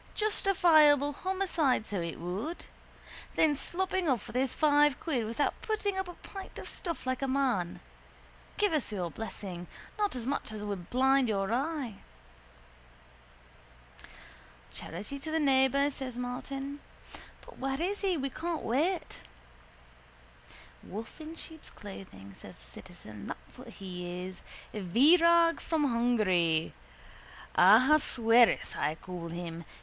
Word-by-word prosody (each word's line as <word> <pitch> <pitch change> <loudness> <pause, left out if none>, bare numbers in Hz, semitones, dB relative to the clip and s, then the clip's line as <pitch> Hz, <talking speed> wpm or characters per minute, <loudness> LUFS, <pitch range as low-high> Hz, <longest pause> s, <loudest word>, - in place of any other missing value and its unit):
Justifiable 315 -9 +4
homicide, 350 - 0
so 200 -5 -3
it 170 -1 -4
would. 195 - -4 0.7
Then 305 -2 +4
sloping 370 +3 -1
off 250 -4 +1
with - - -10
his 260 0 +1
five 295 -2 +3
quid 260 -9 -1
without 235 +6 -1
putting 420 -2 -1
up 380 -1 -2
a 355 - -8
pint 390 -1 -10
of - - -7
stuff 340 -6 -5
like 255 +1 -1
a 270 - 0
man. 255 -10 0 0.8
Give 415 -4 +2
us 295 -7 0
your 180 -5 -3
blessing. 185 -4 -6 0.3
Not 415 -6 +1
as 240 -2 -4
much 275 -4 -2
as 215 -1 -6
would 195 -4 -5
blind 265 0 +3
your 195 0 0
eye. 270 -5 -2 2.7
—Charity 205 +11 -6
to 315 - -5
the 320 +1 +1
neighbour, 275 0 +3
says 255 -3 -6
Martin. 270 +3 -5 0.7
But - - -14
where 270 +1 -2
is 385 +5 -1
he? 380 -4 +1
We 275 -1 -2
can't 335 +2 -3
wait. 325 +10 0 1.6
—A - - -15
wolf 220 - -8
in 315 +1 -8
sheep's 320 -1 -7
clothing, 100 - -11
says - - -12
the - - -18
citizen. 100 - -11
That's - - -9
what 255 - -11
he 180 -4 -6
is. 185 0 -8 0.3
Virag 330 - +5
from 320 -2 0
Hungary! 215 - +2 0.8
Ahasuerus 235 +2 +5
I 155 - 0
call 175 0 -7
him. 170 0 -6
265 Hz, 135 wpm, -30 LUFS, 200-315 Hz, 2.7 s, Virag